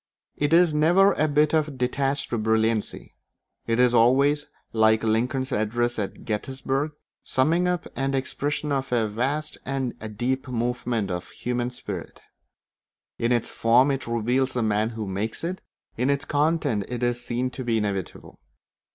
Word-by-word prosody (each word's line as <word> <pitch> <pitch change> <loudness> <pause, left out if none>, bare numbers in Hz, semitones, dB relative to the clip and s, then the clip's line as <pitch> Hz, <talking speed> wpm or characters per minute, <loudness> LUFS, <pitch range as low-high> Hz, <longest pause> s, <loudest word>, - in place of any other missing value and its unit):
It 145 0 0
is 170 -1 +5
never 175 +6 +5
a 155 - +1
bit 150 +1 +2
of 155 -3 +1
detached 135 +2 -1
brilliancy; 110 -1 0 0.5
it 115 +1 +1
is 125 -1 +4
always, 140 +5 +4 0.3
like 110 0 +4
Lincoln's 125 +5 0
address 120 +2 0
at 100 - -5
Gettysburg, 135 +6 -2
the - - -40 0.3
summing 165 +7 +2
up 180 -1 -1
and 135 0 0
expression 145 +2 -2
of 135 -1 -1
a 115 -3 +2
vast 135 +8 -2
and 135 -2 -2 0.2
deep 130 +3 -1
movement 120 -4 -1
of 90 0 -4
the - - -18
human 120 0 -2
spirit. 125 - -7 1.0
In 115 +1 +1
its 120 -2 +1
form 125 +5 +4
it 135 -2 -3
reveals 125 +3 +1
the 120 - 0
man 110 0 +1
who 110 -2 -5
makes 100 +7 -3
it; 180 +3 -3 0.4
in 125 +4 +1
its 140 +1 0
content 145 -8 +1
it 125 0 -3
is 120 0 0
seen 125 +1 -2
to 130 - -6
be 115 -2 +1
inevitable. 100 -3 -4
125 Hz, 160 wpm, -25 LUFS, 115-140 Hz, 1.0 s, is